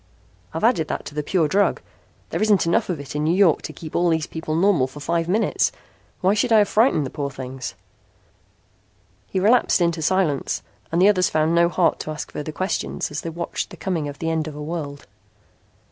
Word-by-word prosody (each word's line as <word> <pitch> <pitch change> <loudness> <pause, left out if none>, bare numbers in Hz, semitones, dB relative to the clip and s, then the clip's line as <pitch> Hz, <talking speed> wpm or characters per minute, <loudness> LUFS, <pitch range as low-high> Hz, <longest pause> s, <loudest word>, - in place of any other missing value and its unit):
I've 160 - -5
added 220 -10 +3
that - - -4
to - - -8
the 150 - -1
pure 160 +1 +1
drug. 200 +6 +2 0.5
There - - -2
isn't 210 -4 +3
enough 170 +2 +1
of 170 -5 -2
it 140 0 -8
in 150 - 0
New 165 +3 +2
York 190 -5 +4
to - - -6
keep 155 0 -9
all 175 0 +3
these 160 -1 +1
people 160 -1 -4
normal 170 -6 +3
for 135 +3 -11
five 165 +2 -1
minutes. 210 +5 +1 0.5
Why 190 +1 +3
should 235 +3 0
I 225 - +7
have 205 -1 +4
frightened 220 - +3
the 130 - -6
poor 145 -2 -3
things?" 130 -1 -7 1.5
He 190 - -1
relapsed 225 +4 +4
into 170 -2 +1
silence 160 -4 0 0.3
and 170 - +1
the 190 - +6
others 185 -3 +3
found 155 +1 +1
no 170 0 +4
heart 175 -1 +2
to - - -5
ask 155 0 -5
further 150 +1 -5
questions 185 -1 -2
as 150 - -3
they 165 - -4
watched 170 +1 -4
the - - -11
coming 170 -6 -2
of 140 -1 -7
the 165 0 -2
end 160 -1 -1
of 155 - -7
a 150 - -6
world. 150 -3 -5
165 Hz, 215 wpm, -22 LUFS, 150-185 Hz, 1.5 s, I